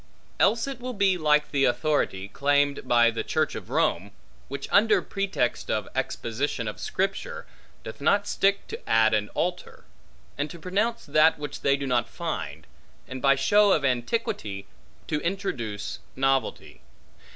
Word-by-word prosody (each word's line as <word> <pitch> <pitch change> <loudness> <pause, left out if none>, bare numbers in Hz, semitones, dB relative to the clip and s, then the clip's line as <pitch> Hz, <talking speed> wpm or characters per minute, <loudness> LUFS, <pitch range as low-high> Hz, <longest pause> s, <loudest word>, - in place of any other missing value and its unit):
Else 225 +3 +3
will 255 -2 -6
it - - -13
be 195 -2 +3
like 150 -3 +2
the 135 -2 +2
authority, 125 -6 0
claimed 145 +2 +1
by 120 -1 +5
the 115 - -3
Church - - 0
of - - -8
Rome, 90 +4 +1 0.4
which 140 +1 -6
under 215 +2 +5
pretext 195 - -2
of - - -1
exposition 115 0 -2
of 105 - -5
Scripture, - - -3 0.4
doth 110 - -9
not 200 +7 +3
stick 200 -1 +1
to - - -8
add 110 0 +4
and 105 -1 0
alter; 180 +1 -3 0.5
and 145 +1 -1
to 170 - -9
pronounce 210 +7 -1
that 155 +2 +4
which 145 -1 -6
they 140 0 +3
do 140 - -4
not 125 -3 0
find; - - -5 0.4
and 130 0 -7
by 140 0 +5
show 205 +9 +4
of 145 - +1
antiquity, 120 - -2 0.4
to 150 -1 -2
introduce 130 - -3 0.2
novelty. 135 0 -1
145 Hz, 150 wpm, -26 LUFS, 120-190 Hz, 0.5 s, by